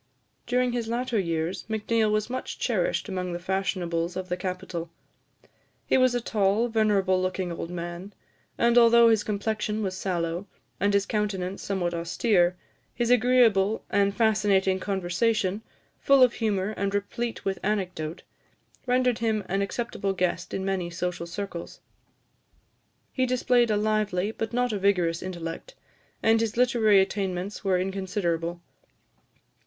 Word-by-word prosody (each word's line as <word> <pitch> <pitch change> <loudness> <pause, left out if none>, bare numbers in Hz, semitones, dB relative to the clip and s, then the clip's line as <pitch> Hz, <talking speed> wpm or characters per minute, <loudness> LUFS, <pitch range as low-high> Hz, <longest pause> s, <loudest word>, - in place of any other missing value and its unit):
During 250 0 +1
his 240 -2 -2
latter 240 0 -1
years, 165 0 -2
Macneill 220 0 +1
was 215 0 0
much 255 +1 -5
cherished - - 0
among 180 -3 -3
the - - -2
fashionables 180 -2 -2
of 185 0 -5
the 180 - 0
capital. 180 -2 -5 1.0
He - - +2
was 255 -1 +4
a - - +2
tall, 215 +1 +1
venerable 200 -4 +2
looking 185 -1 -2
old 165 0 -5
man; 175 +3 -6 0.4
and 235 +1 +5
although 235 0 +7
his 220 -2 +3
complexion 210 +1 -2
was 190 -2 -2
sallow, 175 0 -2 0.3
and 200 0 +2
his 200 0 +2
countenance 195 -3 -2
somewhat 180 -3 -2
austere, 175 +2 +1 0.4
his 240 0 0
agreeable 230 -4 +3
and 200 0 +2
fascinating 205 -4 +2
conversation, 195 +2 0 0.4
full 275 -2 +5
of 250 - +4
humour 205 -3 -1
and 200 0 -1
replete 230 +3 -3
with 195 -1 -1
anecdote, 180 -6 -3 0.6
rendered 250 -1 +2
him 220 -3 0
an 195 +2 0
acceptable 200 -1 -2
guest 180 -2 -1
in 190 - -3
many 190 -3 -1
social 175 0 -4
circles. 175 -1 -6 1.3
He 255 -1 +1
displayed 245 -1 +2
a 210 - +2
lively, 210 -2 0
but 225 0 -4
not 245 -1 0
a 205 - -1
vigorous 180 -4 +1
intellect, 180 - -6 0.5
and 225 0 +4
his 225 0 -2
literary 235 -5 +4
attainments 190 0 -3
were 190 -2 +2
inconsiderable. 180 -3 -2
200 Hz, 140 wpm, -26 LUFS, 185-225 Hz, 1.3 s, although